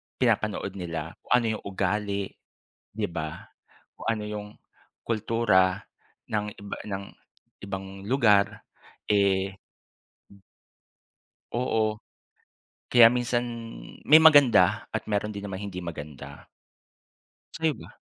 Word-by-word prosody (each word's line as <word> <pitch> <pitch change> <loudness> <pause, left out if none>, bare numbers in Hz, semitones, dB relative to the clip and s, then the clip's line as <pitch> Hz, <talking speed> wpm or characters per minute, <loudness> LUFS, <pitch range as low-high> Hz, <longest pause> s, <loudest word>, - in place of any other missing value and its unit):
pinapanood 110 -5 0
nila. 80 -2 -4
Kung - - -2
ano 120 - 0
yung - - -19
ugali 100 +1 -1 0.7
'di 105 0 -2
ba, 80 -1 -6 0.5
kung - - -11
ano 110 -2 -2
yung 105 -1 -5 0.6
kultura 110 -4 +2 0.5
ng 105 -1 0
iba 100 0 -7
ng 100 -1 -4 0.6
ibang 95 0 -7
lugar 105 -7 +3 0.4
eh 95 -1 +2 2.0
Oo. 110 -3 0 0.9
Kaya 120 -2 +8
minsan 120 -1 0 0.6
may 155 +2 +8
maganda 120 - +6
at 110 - -1
meron 105 +1 -1
din 100 - -6
namang 100 0 -5
hindi 90 -2 -6
maganda. 75 -4 -8 1.1
Sa'yo 160 -1 +1
ba? - - -13
105 Hz, 105 wpm, -26 LUFS, 95-115 Hz, 2.0 s, Kaya